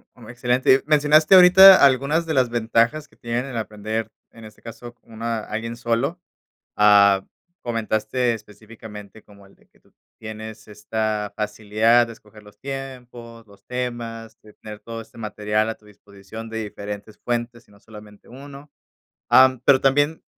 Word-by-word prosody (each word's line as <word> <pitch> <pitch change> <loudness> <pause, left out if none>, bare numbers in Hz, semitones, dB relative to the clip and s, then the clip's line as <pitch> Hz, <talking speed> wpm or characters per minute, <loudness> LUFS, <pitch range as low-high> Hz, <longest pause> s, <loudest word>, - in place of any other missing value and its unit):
Mm, 120 -3 -15
excelente, 125 +2 +1
mencionaste 155 +3 +4
ahorita 185 0 +8
algunas 140 +5 +1
de 160 - -3
las 130 -4 +2
ventajas 115 +5 0
que - - -27
tienen 120 +2 -4
el 135 -3 -7
aprender, 110 0 -5 0.2
en 115 -1 -14
este 105 - -16
caso, 120 +1 -11
con 120 - -26
una, 115 +1 -4
alguien 115 +2 -6
solo, 120 +8 -2 0.6
ah, 100 -2 +4 0.4
comentaste 115 +1 -2
específicamente 105 -1 -12
como 100 -1 -19
el 95 - -22
de - - -30
que - - -31
tú - - -32 0.2
tienes 110 0 -10
esta 105 0 -4
facilidad 110 +3 +1
de 115 - -9
escoger 105 -1 -19
los 105 0 -18
tiempos, 125 -4 -9
los 100 -1 -21
temas, 120 -2 -6
de 105 - -18
tener 105 -1 -11
todo 115 0 -8
este 115 - -18
material 105 0 -2
a 115 - -5
tu 105 - -27
disposición 105 +2 -12
de 115 0 -5
diferentes 105 0 -9
fuentes 120 0 -5
y - - -25
no 100 - -21
solamente 105 -1 -16
1 140 +2 -13 0.6
ah, 130 0 +7
mm, 130 -2 -12
pero 130 -2 +4
también 145 +4 +1
115 Hz, 160 wpm, -21 LUFS, 105-125 Hz, 0.6 s, ahorita